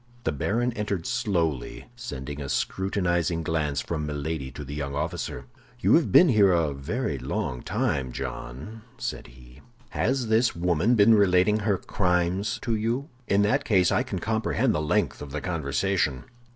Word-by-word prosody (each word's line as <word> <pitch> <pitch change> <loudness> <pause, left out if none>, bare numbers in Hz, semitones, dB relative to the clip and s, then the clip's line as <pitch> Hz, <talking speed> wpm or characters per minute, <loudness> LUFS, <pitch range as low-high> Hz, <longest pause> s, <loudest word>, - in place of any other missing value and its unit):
The - - 0
baron 115 - 0
entered 105 -6 -3
slowly, 90 - -1
sending 75 - -6
a 70 - -5
scrutinizing 85 -1 0
glance 75 -4 -1
from 75 0 -3
Milady 75 -1 -3
to 75 - -7
the 70 - -7
young 70 -1 -4
officer. 75 -5 -3 0.3
"You - - +3
have 165 - +4
been 180 - +7
here 105 -6 +5
a 80 -4 +1
very 75 - -3
long 60 -1 -3
time, 65 -3 -1
John," 70 - -6 0.2
said 125 -1 -5
he. - - -16 0.3
"Has 130 -1 0
this 110 +2 +2
woman 90 +6 +2
been 110 +1 +6
relating 100 0 +4
her 105 -2 +1
crimes 90 +3 0
to 115 - 0
you? 115 +7 -1 0.2
In 100 +1 +3
that 140 +8 +2
case 95 -7 +3
I - - +3
can 115 -7 -4
comprehend 110 +4 0
the 75 - 0
length 75 - 0
of 75 - -7
the 75 +2 -4
conversation." 80 -2 -1
90 Hz, 165 wpm, -26 LUFS, 75-110 Hz, 0.3 s, been